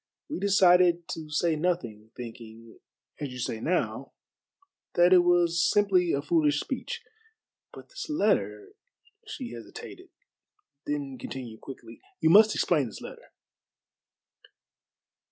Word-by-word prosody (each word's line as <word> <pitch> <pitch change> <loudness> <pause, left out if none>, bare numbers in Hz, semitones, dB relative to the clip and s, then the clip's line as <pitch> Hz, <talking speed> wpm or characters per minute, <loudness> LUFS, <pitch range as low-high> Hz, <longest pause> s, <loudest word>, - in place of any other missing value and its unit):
We 300 - -4
decided 180 -3 +4
to 155 -2 -6
say 160 +2 +1
nothing, 150 -11 -2
thinking 115 -1 -10 0.4
as 145 - -4
you 125 - -9
say 115 -2 -3
now 175 +10 -2 0.8
that 175 +1 +5
it 185 - +8
was 175 -1 +3
simply 190 -5 +3
a 140 - -1
foolish 150 -2 +2
speech. 265 - -5 0.7
But - - -13
this - - -8
letter" 105 - 0 0.6
she 265 - -7
hesitated, 115 - -10 0.8
then 140 -3 -4
continued 120 -3 -8
quickly, 135 - -11 0.2
"you 160 - +3
must 215 +3 +7
explain 150 -7 +1
this 110 - -9
letter." - - -11
165 Hz, 120 wpm, -27 LUFS, 125-180 Hz, 0.8 s, it